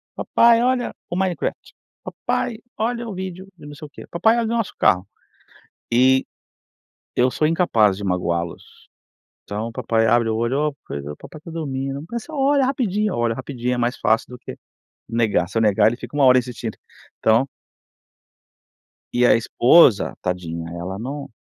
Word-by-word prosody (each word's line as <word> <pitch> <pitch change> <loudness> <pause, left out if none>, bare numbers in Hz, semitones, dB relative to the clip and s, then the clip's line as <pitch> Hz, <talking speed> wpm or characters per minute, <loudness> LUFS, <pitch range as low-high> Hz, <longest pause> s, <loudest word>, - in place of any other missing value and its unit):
"Papai 235 0 +4
olha 250 0 0 0.2
o 175 - -3
Minecraft, 185 -2 -2 0.3
papai 230 -2 -3 0.2
olha 235 +2 -2
o 210 - -5
vídeo 185 0 -6
de 145 - -13
não 145 - -9
sei 150 - -9
o - - -23
quê, - - -12
papai 220 +7 +3
olha 235 - +1
o 230 +1 -1
nosso 225 - -2
carro". 90 +1 +3 0.8
E 130 +2 +4 0.9
eu 125 +1 +3
sou 155 - 0
incapaz 115 - +2
de 100 - -7
magoá-los. 85 -2 -3 0.6
Então 105 +3 -4
o - - -7
papai 115 0 0
abre 115 0 +3
o 110 - 0
olho, 135 +6 0
"oh, 140 - -13
pois, 70 0 -5
o 75 0 -6
papai 155 - -12
está 165 - -12
dormindo", 135 -3 -4
"mas 235 -2 -3
só 315 - -12
olha 275 0 +3
rapidinho", 215 -6 0
eu - - -3
olho 115 -1 0
rapidinho 125 -2 -3
é - - -2
mais 120 +1 -1
fácil 110 +1 +1
do 125 - -9
que - - -8 0.5
negar, 110 -7 +1
se 115 - -2
eu - - +2
negar 105 -1 +4
ele 120 - -2
fica 145 - -9
uma 140 - +4
hora 130 0 +7
insistindo, 120 -3 -5 0.4
então 115 +4 +3 1.7
e 125 0 +3
a - - +6
esposa, 120 +1 +4
tadinha, 85 -2 -4
ela 90 +3 -5
não 140 +3 -6
130 Hz, 180 wpm, -21 LUFS, 110-180 Hz, 1.7 s, hora